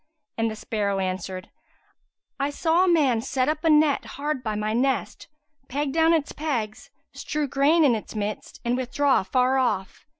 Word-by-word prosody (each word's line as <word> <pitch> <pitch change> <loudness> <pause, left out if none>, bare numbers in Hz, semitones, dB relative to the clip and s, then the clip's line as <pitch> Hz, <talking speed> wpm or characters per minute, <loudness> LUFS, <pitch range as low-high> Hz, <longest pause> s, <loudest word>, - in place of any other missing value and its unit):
and 225 0 0
the 215 - -5
sparrow 205 -2 -2
answered, 185 0 -4 0.9
"I 280 +1 0
saw 325 +4 +2
a 365 - +3
man 270 -9 +3
set 260 +1 -1
up 305 0 -1
a 325 - +3
net, 300 -2 +4
hard 290 -1 -2
by 215 -3 -3
my 215 +1 -1
nest, 265 +3 -1 0.4
peg 280 +1 -2
down 325 +1 +4
its 320 -3 +1
pegs, 240 -9 -3 0.2
strew 300 -1 -3
grain 295 +5 +3
in 260 - +4
its 220 0 -5
midst 210 0 -4
and 240 +1 +1
withdraw 260 +2 +2
afar 255 +7 +1
off. 205 -5 -2
260 Hz, 170 wpm, -25 LUFS, 215-300 Hz, 0.9 s, net